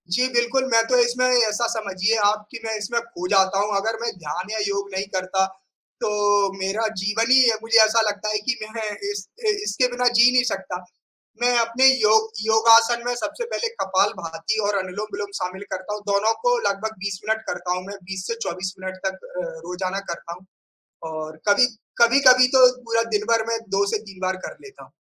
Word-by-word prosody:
जी 250 +1 +2
बिल्कुल, 240 +2 +1
मैं 230 0 +5
तो 255 - +3
इसमें 245 +1 0
ऐसा 235 -2 +2
समझिए 215 -2 -1
आप 210 +1 +1
कि 230 - -7
मैं 220 0 -2
इसमें 215 +3 -2
खो 205 -6 -7
जाता 195 0 +3
हूँ, 205 0 0
अगर 225 +3 -2
मैं 235 0 -1
ध्यान 175 +4 -6
या 220 - -2
योग 200 0 -3
नहीं 190 +1 -2
करता 185 +1 0 0.6
तो 205 -1 +1
मेरा 200 +4 -1
जीवन 225 +5 0
ही 260 -2 +7
अ, 220 - -2
मुझे 225 0 +3
ऐसा 220 +1 +2
लगता 205 +1 -4
है 215 - +1
कि 260 - +1 0.2
मैं 220 -2 -3 0.2
इस 200 -2 -6 0.2
इ - - +5
इसके 255 -10 +1
बिना 250 0 0
जी 240 +1 +7
नहीं 250 0 +4
सकता, 190 -2 -5 0.7
मैं 245 0 +3
अपने 230 +3 +3 0.2
योग 220 +1 +4 0.2
योगासन 230 +1 +5
में 245 - 0
सबसे 240 - -4
पहले 470 - -1
कपालभाति 185 -1 -1
और 205 - 0
अनुलोम-विलोम 200 +2 -5
शामिल 185 +1 -5
करता 190 +2 -4
हूँ, 210 - -7
दोनों 200 +2 +2
को - - +3
लगभग 220 +2 -4
20 200 -2 -4
मिनट 220 0 0
करता 180 +1 -2
हूँ 180 - -6
मैं, 200 - -7
20 190 0 -6
से 230 - -2
24 185 +2 -4
मिनट 185 0 -6
तक 190 - -3 0.2
अ, - - -4 0.2
रोज़ाना 185 +2 -3
करता 170 0 -7
हूँ 190 - -23 0.7
और 155 0 -7
कभी 205 +5 +6 0.4
कभी-कभी 255 +1 +6
तो 255 - +8 0.2
पूरा 230 -1 0 0.2
दिनभर 225 +1 0
मैं 230 0 -1 0.2
2 200 - +3
से - - +2
3 190 - -16
बार 185 0 -1
कर - - -11
लेता 410 0 -14
हूँ। - - -18
210 Hz, 200 wpm, -22 LUFS, 190-230 Hz, 0.7 s, तो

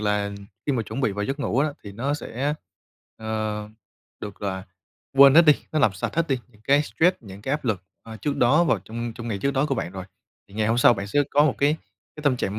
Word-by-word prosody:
là 105 -1 0 0.4
khi 145 - +2
mà 120 - 0
chuẩn 130 - -5
bị 115 -7 +1
vào 105 +1 -2
giấc 140 +4 -3
ngủ 125 -2 -1
á, 150 +3 +3 0.2
thì 100 - -8
nó 130 +8 -1
sẽ, 145 0 -3 0.6
ờ, 110 -1 -3 0.5
được, 100 -2 -6
gọi 100 - -3
là, 95 0 -6 0.5
quên 140 0 +9
hết 170 - +9
đi, 150 - +9 0.2
nó 155 - +1
làm 110 - +4
sạch 95 - -4
hết 165 -1 +1
đi 135 -2 +1
những 105 -3 -24
cái 140 +2 +4
stress, 175 +4 +2
những 100 -2 -12
cái 135 - -2
áp 150 0 -2
lực, 105 -7 -1 0.2
ờ, 110 -1 -9
trước 145 +5 -2
đó 145 +8 +4
vào 135 - +2
trong 115 +5 -6
trong 120 -1 -7
ngày 105 -3 -2
trước 140 - 0
đó 140 +1 +1
của 135 - 0
bạn 90 - -4
rồi, 95 -1 -6 0.4
thì 100 - -17
ngày 110 0 0
hôm 115 +2 +1
sau 120 - +6
bạn 100 -1 -5
sẽ 145 +9 +1
có 145 +1 +4
một 150 - +2
cái 145 +2 +3 0.4
cái 150 - -8
tâm 140 -4 +2
trạng 100 -2 -2
120 Hz, 260 wpm, -24 LUFS, 105-140 Hz, 0.6 s, quên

